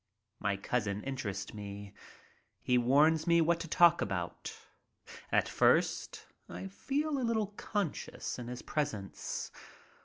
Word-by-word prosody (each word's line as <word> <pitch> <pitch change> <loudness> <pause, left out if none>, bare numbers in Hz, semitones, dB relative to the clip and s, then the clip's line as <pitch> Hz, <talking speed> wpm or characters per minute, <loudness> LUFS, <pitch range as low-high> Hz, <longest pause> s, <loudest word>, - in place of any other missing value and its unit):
My 100 0 0
cousin 105 -1 -1
interests 105 -8 -4
me. 100 -1 -7 0.7
He 125 - +2
warns 150 +6 +4
me 170 0 +5
what 170 +1 +3
to 170 - -5
talk 170 +1 +6
about. 90 -4 -3 0.8
At - - +3
first - - +2 0.2
I 90 +2 -6
felt 270 - -1
a - - -1
little 220 -4 0
conscious 200 - -3
in 120 - -6
his 125 0 -6
presence. 145 -11 -3
125 Hz, 125 wpm, -32 LUFS, 100-170 Hz, 0.8 s, talk